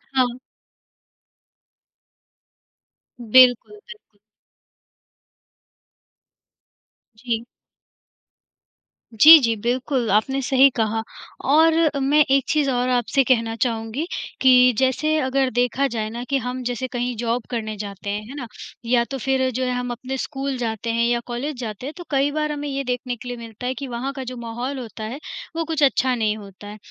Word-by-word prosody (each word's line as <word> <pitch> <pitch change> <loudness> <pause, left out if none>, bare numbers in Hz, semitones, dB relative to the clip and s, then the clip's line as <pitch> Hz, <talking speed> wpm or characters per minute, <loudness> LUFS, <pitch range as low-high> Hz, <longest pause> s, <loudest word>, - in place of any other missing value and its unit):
हाँ। 250 -1 +1 2.8
बिल्कुल, 250 - +5
बिल्कुल। 420 - -15 3.0
जी। 235 0 -3 1.7
जी, 310 +9 +10
जी, 230 -4 +1
बिल्कुल 245 +2 -1
आपने 265 +6 +1
सही 265 +1 +5
कहा। 220 0 0 0.5
और 320 +2 +5 0.3
मैं 295 +3 +4
एक 275 0 +4
चीज़ 300 -2 +2
और 245 0 0
अ, - - +1
आपसे 265 +3 +1
कहना 230 -3 +1
चाहूँगी 230 +4 -2 0.4
कि 250 -1 +6
जैसे 265 +5 +1
अगर 265 -1 +1
देखा 250 +4 +1
जाए 220 -3 -3
ना 240 +2 -6
कि 275 - +2
हम 250 +1 -4
जैसे 245 +1 -3
कहीं 245 0 -3
जॉब 235 +1 -2
करने 220 -3 -4
जाते 200 -1 -7
हैं, 205 +1 -2
है 275 - -8
ना। 250 -5 -6 0.4
या 235 0 +3
तो 270 - -3
फिर 260 0 0
जो 255 +2 -2
है 250 - -1
हम 250 0 -3
अपने 255 +2 -5
स्कूल 270 -1 -4
जाते 230 -1 -3
हैं 235 0 +1
या 240 0 +1
कॉलेज 255 +5 -4
जाते 220 +1 -6
हैं, 290 - -5
तो 350 - -7
कई 275 +1 +2
बार 305 0 -1
हमें 295 0 -4
ये 275 0 -3
देखने 250 0 -3
के 245 - -11
लिए 245 -1 -5
मिलता 230 +1 -8
है 255 - -1
कि 275 0 -7
वहाँ 250 +3 -4
का 265 -1 -6
जो 250 0 -7
माहौल 240 +4 -5
होता 225 -2 -8
है 235 +6 -5 0.4
वो 330 - -1
कुछ 315 -2 -1
अच्छा 260 -2 +3
नहीं 220 -2 0
होता 200 0 -12
है। 210 +1 -9
250 Hz, 160 wpm, -22 LUFS, 230-270 Hz, 3.0 s, जी